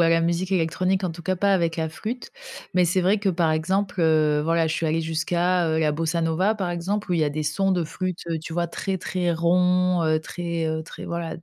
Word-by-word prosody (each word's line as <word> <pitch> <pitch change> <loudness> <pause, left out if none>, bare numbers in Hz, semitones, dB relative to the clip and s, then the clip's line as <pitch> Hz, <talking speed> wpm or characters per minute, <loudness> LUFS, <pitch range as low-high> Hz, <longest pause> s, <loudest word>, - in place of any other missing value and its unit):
à 165 - +5
la 165 0 +4
musique 170 +3 0
électronique, 185 +2 +1
en 180 - -1
tout 170 +1 -9
cas, 185 +3 0
pas 200 +2 +2
avec 170 -4 +1
la 160 -1 -1
flûte. 220 +10 -6 0.4
Mais 180 -1 +4
c'est 175 +2 +2
vrai 190 +4 +3
que, 200 -1 0
par 170 -3 +2
exemple, 185 +4 0
heu, 155 -2 +3
voilà 165 0 +2
je 160 - -1
suis 165 - -1
allée 160 +1 +1
jusqu'à, 170 +2 0
heu, 160 0 +1
la 155 -1 +2
bossa 165 +2 -1
nova, 180 +6 +1
par 190 -5 -2
exemple, 185 +3 -2
où - - +2
il 165 - +1
y - - +3
a 145 - 0
des 155 +2 -3
sons 190 +6 +1
de 175 -2 +1
flûte, 180 +3 -4
heu, 165 - -1
tu 160 +1 -8
vois, 170 +1 -1
très, 190 +2 -3
très 175 -1 -1
ronds, 180 +1 +2
heu, 155 0 +2
très, 170 0 -3
heu 160 0 -2
très - - -9
voilà 170 -1 -4
d - - -15
170 Hz, 255 wpm, -24 LUFS, 160-185 Hz, 0.4 s, à